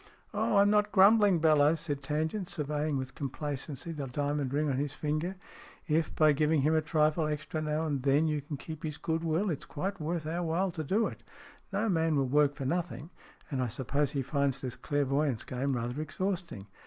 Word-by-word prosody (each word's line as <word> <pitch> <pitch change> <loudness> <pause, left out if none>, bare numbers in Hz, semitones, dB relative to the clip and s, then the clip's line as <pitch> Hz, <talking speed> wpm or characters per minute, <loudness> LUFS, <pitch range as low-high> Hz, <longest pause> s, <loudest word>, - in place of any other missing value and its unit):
" - - -36
Oh, 205 - +1
I'm 200 +1 +5
not 210 0 +3
grumbling, 205 -1 +6
Bellowes," 155 -1 +4
said 145 -4 -3
Tangent, 160 +7 -2
surveying 150 -1 -1
with 130 0 -5
complacency 145 +2 -4
the 145 -4 -4
diamond 145 0 -1
ring 150 +2 +1
on 135 -3 0
his 145 0 -2
ringer. 155 +5 -1 0.3
" - - -21
If, 160 0 +1
by 155 -1 +5
giving 150 +1 +2
him 155 +3 +3
a 160 - +3
trifle 155 0 +2
extra 155 +1 -3
now 155 +1 -1
and 145 -4 -1
then, 140 +4 +3
you 150 -1 0
can 145 +1 -6
keep 155 +2 -8
his 150 -2 -4
goodwill, 165 +4 0
it's 150 - -4
quite 190 +4 -4
worth 160 +1 -2
our 165 +3 -2
while 175 +3 0
to 160 -1 -4
do 205 +9 +1
it. - - -5 0.5
No 205 +3 0
man 165 -5 +2
will 135 -2 +2
work 145 +2 +3
for 135 -2 -5
nothing, 170 +1 -2 0.4
and 135 -2 -1
I 125 - 0
suppose 135 +5 -1
he 140 -1 -2
finds 140 0 0
this 125 -2 -4
clairvoyance 140 -3 0
game 130 +2 -2
rather 120 +4 -3
exhausting. 170 - -3
150 Hz, 205 wpm, -30 LUFS, 140-165 Hz, 0.5 s, grumbling